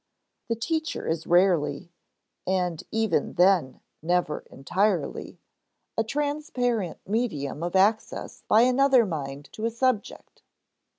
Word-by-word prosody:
The 230 - 0
teacher 315 +7 -3
is 160 0 -2
rarely 175 -1 +2 0.6
(and 180 -3 0
even 225 -1 0
then 180 -7 +3 0.2
never 175 -2 0
entirely) 180 +3 -1 0.6
a 225 - +1
transparent 245 - -1
medium 185 - -2
of 175 +2 -3
access 205 +3 +1
by 220 - +5
another 255 0 +4
mind 145 -5 -5
to 220 - -4
a - - +2
subject. 235 -1 -2
195 Hz, 110 wpm, -26 LUFS, 170-235 Hz, 0.6 s, by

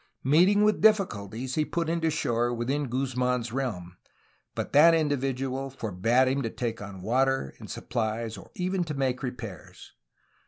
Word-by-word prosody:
Meet 155 +8 +5
ing 205 0 +3
with 215 0 +2
difficulties 130 - +1
he 155 - +2
put 165 +2 -2
in 165 +1 -1
to 160 - +2
shore 120 -6 0
within 130 +5 -1
Guzman's 125 -2 -1
realm, 95 -10 -4 0.6
but - - -4
that 165 +3 +7
individual 135 -3 -1
forbade 115 +1 +1
him 135 +2 +1
to 115 - -2
take 115 -1 -4
on 100 -2 -8
water 130 - +1
and - - -10
supplies 115 -1 -3
or 95 - -12
even 185 0 -1
to 150 -2 -4
make 130 -2 -1
repairs. 115 - -8
130 Hz, 160 wpm, -27 LUFS, 115-150 Hz, 0.6 s, that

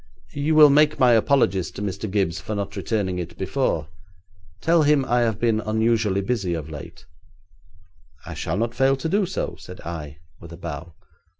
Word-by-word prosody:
'You 145 +2 0
will 150 -2 +8
make 150 +1 +4
my 125 -2 +5
apologies 110 -5 +2
to - - -9
Mr. 100 +2 -4
Gibbes 95 -3 -1
for 110 -1 -4
not 100 0 -4
returning 100 -2 -2
it 85 -1 -7
before. 95 - -1 0.7
Tell 165 0 +3
him 145 -2 +3
I 120 -1 +2
have 115 -3 +1
been 115 -2 +2
unusually 110 -2 +1
busy 100 -4 -1
of 80 -1 -6
late.' 75 - -10 1.2
'I - - -7
shall 80 - -3
not 115 +2 -1
fail 135 +2 +3
to 135 +4 -4
do 200 +3 +1
so,' 190 - -4
said 90 - -11
I, 75 -4 -7 0.2
with 85 - -12
a 85 - -9
bow. 85 -1 -7
110 Hz, 180 wpm, -23 LUFS, 90-135 Hz, 1.2 s, will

